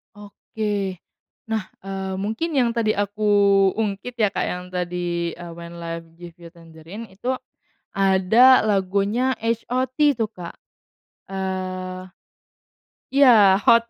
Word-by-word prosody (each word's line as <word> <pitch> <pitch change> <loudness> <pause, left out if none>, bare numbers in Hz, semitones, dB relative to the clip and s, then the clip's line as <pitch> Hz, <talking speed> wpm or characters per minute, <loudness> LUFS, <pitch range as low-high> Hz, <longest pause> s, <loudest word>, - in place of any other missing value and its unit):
Oke, 205 -1 -4 0.5
nah, 220 -3 -3 0.2
eee, 190 -1 -4
mungkin 220 - -3
yang 245 -3 +3
tadi 230 -2 0
aku 205 +1 -3 0.5
ungkit 215 +2 -3
ya 215 -4 +1
Kak - - -1
yang 180 0 -4
tadi, 175 -1 -3
eee, 175 -1 -9
When 170 0 -10
Live 165 -1 -6
Give 175 0 -11
You 170 - -11
Tangerine 165 +6 -11
itu, 245 +7 -3 0.5
ada 195 +7 +5
lagunya 205 +5 +1
H.O.T 245 +3 -2 0.2
tuh 225 -3 -2
Kak, 180 -5 -9 0.8
eee, 185 -1 -4 1.0
iya 230 -9 +6
hot, 230 +3 +4
195 Hz, 115 wpm, -22 LUFS, 180-225 Hz, 1.0 s, iya